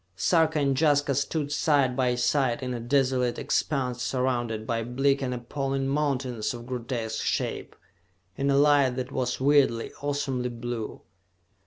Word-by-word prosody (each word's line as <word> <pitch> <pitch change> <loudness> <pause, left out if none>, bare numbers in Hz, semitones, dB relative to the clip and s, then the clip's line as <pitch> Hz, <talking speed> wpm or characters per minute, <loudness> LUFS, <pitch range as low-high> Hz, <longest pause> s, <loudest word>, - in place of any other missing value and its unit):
Sarka 160 - +2
and 140 -2 +2
Jaska 145 -2 +3
stood 145 +2 -1
side 140 -4 +2
by 125 -2 +1
side 125 +1 +1
in 125 -1 -3
a 120 - -4
desolate 125 0 +1
expanse 125 -4 -1
surrounded 120 -4 -1
by 115 0 -1
bleak 135 +4 +1
and 130 -2 -2
appalling 135 +2 -2
mountains 135 -5 -1
of 120 0 -9
grotesque 120 -3 -3
shape, - - -2 0.6
in 140 +5 0
a 140 - +3
light 140 -3 +4
that 130 +1 -4
was 125 -2 -2
weirdly, 135 -4 +3
awesomely 140 -3 -1
blue. 120 -2 -5
130 Hz, 145 wpm, -27 LUFS, 120-140 Hz, 0.6 s, light